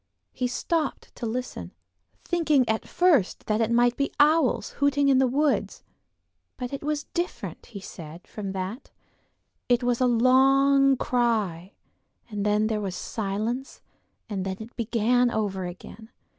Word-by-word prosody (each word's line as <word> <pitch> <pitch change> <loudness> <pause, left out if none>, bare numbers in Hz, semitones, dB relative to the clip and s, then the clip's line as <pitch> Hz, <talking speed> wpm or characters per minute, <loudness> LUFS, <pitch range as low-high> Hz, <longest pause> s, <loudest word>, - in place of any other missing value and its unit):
He 250 - -1
stopped 310 +4 -2
to 235 - -3
listen, 225 - -5 0.5
thinking 305 -7 +2
at 220 0 -1
first 330 - +2
that 215 +1 0
it 225 - +1
might 240 +1 +3
be 280 - -1
owls 290 -7 +3
hooting 285 0 +3
in 265 -1 +5
the 265 - +4
woods; 285 +4 0 0.7
but 250 +1 -5
it 275 - -4
was 300 0 -2
different, 350 +1 -4
he 205 - -9
said, 170 -2 -10
from 200 -3 -6
that: 190 +7 -5 0.8
it 245 0 +3
was 245 0 0
a 255 - +4
long 270 +3 +4
cry, 215 -9 0 0.6
and 205 -1 -3
then 210 +1 +2
there 215 -1 -1
was 190 -3 -4
silence 220 +7 -4 0.4
and 200 -4 -3
then 190 0 -3
it 225 +2 -10
began 240 +2 +2
over 200 -5 -2
again. 185 +5 -10
240 Hz, 145 wpm, -26 LUFS, 210-270 Hz, 0.8 s, in